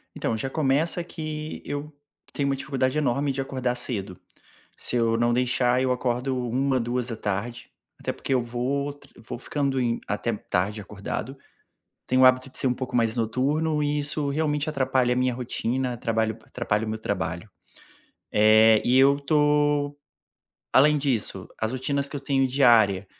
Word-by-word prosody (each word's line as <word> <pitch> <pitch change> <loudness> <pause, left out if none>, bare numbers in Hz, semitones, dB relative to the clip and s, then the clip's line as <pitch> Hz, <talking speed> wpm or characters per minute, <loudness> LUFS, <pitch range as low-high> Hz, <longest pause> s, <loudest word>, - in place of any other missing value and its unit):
Então, 110 - -1
já 135 +3 -3
começa 155 +4 +1
que 155 -2 -6
eu 145 +1 -5 0.4
tenho 140 -1 -1
uma 135 - +1
dificuldade 135 0 -1
enorme 140 0 +1
de 135 0 -2
acordar 130 -2 -2
cedo. 100 -7 -4 0.6
Se 125 - -1
eu 115 -1 +2
não 120 +1 +2
deixar 125 0 +2
eu 130 -1 +2
acordo 125 +1 -1
13h, 130 +1 +1
14h, 120 -2 -3 0.3
até - - -3
porque 135 - -2
eu 125 - +2
vou 130 +4 -2
tr 145 - -19
vou 115 +1 -7
ficando 135 -1 -1
em 120 -1 0
até 110 +3 -2
tarde 105 +1 -2
acordado. 105 +6 -6 0.7
Tenho 130 +1 +3
o - - +9
hábito 130 +1 +4
de - - -11
ser 130 - +1
um 125 - +2
pouco 125 -1 -5
mais 115 -1 +2
noturno 145 +7 0
e 145 0 0
isso 145 0 0
realmente 150 0 0
atrapalha 130 -3 +1
a - - -3
minha 125 -1 +1
rotina, 125 +1 -2
trabalha 110 -1 0
atrapalha 110 -2 -2
o - - -4
meu 110 0 -3
trabalho. 95 -2 -3 0.8
Eh, 110 +1 +6
e 125 +2 +4
eu 140 +1 +5
tô 145 0 +2 0.8
além 150 +3 +6
disso, 120 -9 -1
as 110 +2 -1
rotinas 140 +2 -1
que 145 - -6
eu - - -5
tenho 135 -1 +1
diária, 115 -8 +4
130 Hz, 165 wpm, -25 LUFS, 115-140 Hz, 0.8 s, o